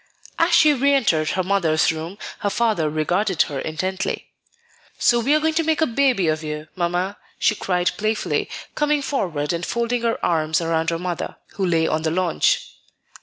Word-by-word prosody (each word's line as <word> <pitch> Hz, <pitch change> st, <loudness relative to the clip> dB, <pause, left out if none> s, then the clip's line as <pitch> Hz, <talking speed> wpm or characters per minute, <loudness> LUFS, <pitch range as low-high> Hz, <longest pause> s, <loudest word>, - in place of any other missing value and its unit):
As 340 Hz, +1 st, +4 dB
she 305 Hz, -2 st, +6 dB
re 280 Hz, +1 st, +3 dB
entered 160 Hz, -, +2 dB
her 185 Hz, -, 0 dB
mother's 175 Hz, -6 st, +2 dB
room, 160 Hz, +4 st, -6 dB, 0.2 s
her 205 Hz, -, 0 dB
father 210 Hz, -8 st, +1 dB
regarded 175 Hz, +5 st, +1 dB
her 140 Hz, -3 st, -5 dB
intently. 185 Hz, +6 st, -3 dB, 0.7 s
"So 240 Hz, -, +3 dB
we 270 Hz, +6 st, +2 dB
are -, -, +3 dB
going 320 Hz, +1 st, +1 dB
to 330 Hz, +1 st, +1 dB
make 320 Hz, -1 st, +1 dB
a 320 Hz, -, +4 dB
baby 245 Hz, -, +2 dB
of 155 Hz, 0 st, 0 dB
you, 150 Hz, 0 st, -5 dB
Mamma," 180 Hz, +2 st, -1 dB, 0.2 s
she -, -, +3 dB
cried 180 Hz, -3 st, 0 dB
playfully, 215 Hz, +1 st, -1 dB, 0.2 s
coming 295 Hz, -1 st, +1 dB
forward 170 Hz, -, -1 dB
and 170 Hz, 0 st, -3 dB
folding 235 Hz, +4 st, -1 dB
her 230 Hz, -1 st, 0 dB
arms 160 Hz, -2 st, +1 dB
around 165 Hz, -1 st, 0 dB
her 165 Hz, -, -1 dB
mother, 175 Hz, -1 st, -4 dB, 0.2 s
who 195 Hz, -, -4 dB
lay 165 Hz, -2 st, +2 dB
on 155 Hz, -, 0 dB
the 160 Hz, -, 0 dB
lounge. 175 Hz, +1 st, +1 dB
185 Hz, 180 wpm, -22 LUFS, 160-235 Hz, 0.7 s, she